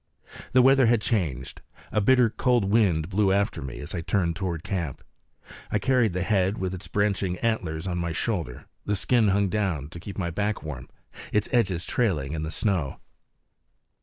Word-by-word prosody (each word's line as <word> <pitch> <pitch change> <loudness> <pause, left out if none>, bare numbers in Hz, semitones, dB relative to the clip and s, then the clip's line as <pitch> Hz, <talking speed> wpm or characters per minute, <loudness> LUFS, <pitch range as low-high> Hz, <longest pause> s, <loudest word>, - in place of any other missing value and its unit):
The 130 0 +6
weather 135 -1 +6
had 115 -1 +4
changed; 90 - -2 0.3
a 105 - +1
bitter 125 +1 +4
cold 120 -3 +2
wind 95 -7 +2
blew 100 +1 +2
after 100 -3 0
me 65 -3 -6
as 75 - -7
I 85 - -2
turned 85 -1 0
toward 90 -5 -3
camp. 90 -9 -4 0.7
I - - +1
carried 115 -1 +2
the 90 0 -1
head 95 -1 +1
with 95 -1 -2
its 95 +1 -7
branching 100 -3 0
antlers 90 -9 -2
on 90 -2 -2
my 85 -1 -2
shoulder; 80 - -3 0.2
the 105 - -1
skin 115 +3 +2
hung 100 0 +2
down, 90 -8 -1
to 85 - -9
keep 95 +3 -8
my 85 -3 -2
back 105 +4 -2
warm, 75 -5 -7 0.4
its 105 -1 +1
edges 95 -8 +1
trailing 80 - 0
in 80 - -3
the 80 - -3
snow. 85 -4 -1
95 Hz, 180 wpm, -26 LUFS, 85-105 Hz, 0.7 s, The